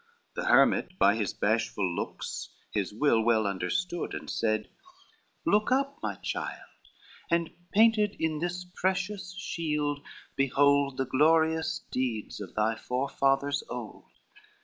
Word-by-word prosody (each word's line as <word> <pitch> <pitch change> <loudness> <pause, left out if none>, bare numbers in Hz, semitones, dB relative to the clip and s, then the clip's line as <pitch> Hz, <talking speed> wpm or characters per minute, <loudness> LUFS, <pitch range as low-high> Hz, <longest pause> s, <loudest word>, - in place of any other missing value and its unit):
The - - -4
hermit 180 - +4
by 100 - +5
his 105 -4 -1
bashful 105 -2 0
looks 85 - -4 0.2
his 100 -4 -1
will 115 +1 +3
Well 110 -1 +3
understood, 130 - -2
and - - -7
said, 110 -1 0 0.8
"Look 210 +3 +3
up, 275 +2 +1
my - - -2
child, - - -5 0.6
And 170 -1 +1 0.2
painted 215 -1 +4
in 160 -1 0
this 175 +2 -3
precious 185 +1 -2
shield 150 -5 -2 0.3
behold 140 0 +3
The 135 - 0
glorious 160 +4 +2
deeds 120 -5 -2
of 95 - -8
thy 110 +1 +2
forefathers 135 +3 0
old. 120 -3 -7
145 Hz, 125 wpm, -29 LUFS, 115-175 Hz, 0.8 s, by